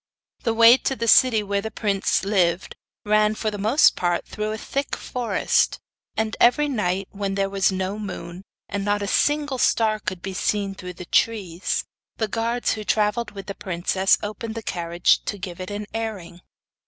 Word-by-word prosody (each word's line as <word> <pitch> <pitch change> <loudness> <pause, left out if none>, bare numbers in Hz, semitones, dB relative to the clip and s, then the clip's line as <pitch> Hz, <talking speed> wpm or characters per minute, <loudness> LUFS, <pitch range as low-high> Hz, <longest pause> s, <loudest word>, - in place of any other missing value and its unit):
The 230 -2 0
way 230 +2 +8
to 270 - -2
the 230 -2 -3
city 225 -2 +5
where 200 0 -1
the 220 - -4
prince 205 -4 0
lived 185 -3 +1 0.3
ran 215 0 +3
for 215 0 -2
the 205 - -6
most 220 +9 +4
part 175 -1 0
through 215 0 -4
a 215 - -3
thick 275 +5 -3
forest, 245 -2 0 0.4
and 220 0 -1
every 295 +5 +4
night 195 -7 -1
when 200 -1 -3
there 195 0 0
was 195 0 +2
no 190 +2 -3
moon, 180 -3 -7 0.3
and 200 0 -3
not 205 0 0
a - - -3
single 290 +3 +1
star 220 -3 +2
could 185 -3 -5
be 195 - -4
seen 200 +1 -1
through 180 -1 -8
the 180 0 -9
trees, 185 -3 0 0.3
the 220 - 0
guards 230 +3 -1
who 215 - -5
travelled 210 +2 +1
with 195 -2 -9
the 200 - -5
princess 190 +1 +1
opened 220 +2 -5
the 225 - -5
carriage 170 -1 +1
to 205 - -3
give 185 -2 -7
it 185 - -6
an 205 +1 -4
airing. 210 -6 -5
205 Hz, 185 wpm, -23 LUFS, 190-225 Hz, 0.4 s, way